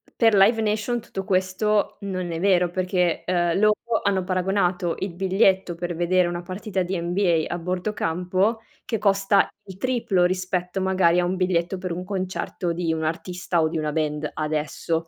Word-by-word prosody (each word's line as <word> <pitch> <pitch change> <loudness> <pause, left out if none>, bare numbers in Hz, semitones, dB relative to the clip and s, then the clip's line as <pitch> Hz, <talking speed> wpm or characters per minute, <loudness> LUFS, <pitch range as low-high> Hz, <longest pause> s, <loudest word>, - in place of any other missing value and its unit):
per 225 -2 +4
Life 220 +4 +5
Nation 220 +2 0
tutto 195 -4 -6
questo 190 +2 +1
non 185 -3 -3
è 165 - -3
vero, 180 -2 +3
perché, 180 -1 0
uhm, 175 -2 +1
loro 215 0 +4 0.3
hanno 195 -2 +1
paragonato 185 -1 0
il 190 -2 -3
biglietto 190 -1 +2
per 175 0 -4
vedere 175 +1 +2
una 175 0 -4
partita 190 +1 -3
di 185 +1 -2
NBA 170 -1 +1
a - - -2
bordo 180 +4 -2
campo, 185 +7 0 0.3
che 225 - -2
costa 200 -1 +3
il 190 -2 -11
triplo 225 -6 +1
rispetto 185 +1 -1
magari 185 -2 +3
a 175 - +2
un 185 +2 -1
biglietto 180 0 0
per 185 -1 -5
un 180 +2 -4
concerto 185 -2 -3
di 165 -1 -1
un 160 - -3
artista 175 +2 -1
o 160 - +3
di 165 - -3
una 155 -1 -1
band, 150 -1 -1
adesso. 155 +2 -2
185 Hz, 175 wpm, -24 LUFS, 175-195 Hz, 0.3 s, Life